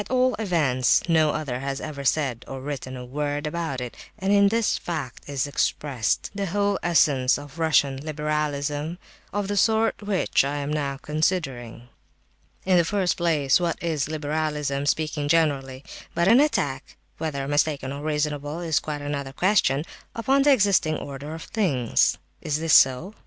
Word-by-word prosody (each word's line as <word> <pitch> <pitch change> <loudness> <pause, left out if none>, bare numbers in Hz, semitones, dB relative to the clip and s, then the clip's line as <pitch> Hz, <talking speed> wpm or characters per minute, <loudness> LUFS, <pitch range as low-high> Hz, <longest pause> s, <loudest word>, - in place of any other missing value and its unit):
At - - -9
all 255 0 +3
events, 150 - +2
no 160 -2 +4
other 145 -5 -3
has 135 +1 -3
ever 145 -3 -6
said 135 -4 0
or 135 - -6
written 130 -1 -5
a 125 - -7
word 145 +3 -3
about 150 -4 -3
it; 125 -1 -6 0.2
and 195 -1 0
in 200 0 +6
this 225 +1 +1
fact 145 -7 -5
is 140 -3 -1
expressed 140 -4 -1
the 200 -1 -3
whole 200 +2 0
essence 140 -7 +3
of 145 +2 -11
Russian 145 -4 +2
liberalism 150 +1 -2 0.3
of 205 -1 -2
the 205 - -2
sort 220 +3 +2
which 205 -8 +1
I 140 +1 -2
am 145 +1 -3
now 140 -2 -2
considering. 135 -7 -2 0.8
"In 185 -1 +4
the - - +4
first 190 +1 0
place, 155 -5 +2
what 170 -2 -1
is 160 -5 -1
liberalism, 150 -2 -2
speaking 150 -1 0
generally, 140 -4 +1 0.3
but 170 +1 +2
an 230 +5 +7
attack 145 - 0 0.2
(whether 140 -4 -3
mistaken 145 -2 0
or 140 - -6
reasonable, 150 0 -2
is 165 -4 +1
quite 150 -1 -5
another 140 -2 -4
question) 165 -5 +2 0.3
upon 265 +5 +2
the 285 +1 +5
existing 200 - +3
order 145 +2 -7
of 165 - -8
things? 140 - +1 0.2
Is 150 -1 -1
this 160 -1 +1
so? 135 +10 +5
150 Hz, 165 wpm, -24 LUFS, 140-175 Hz, 0.8 s, an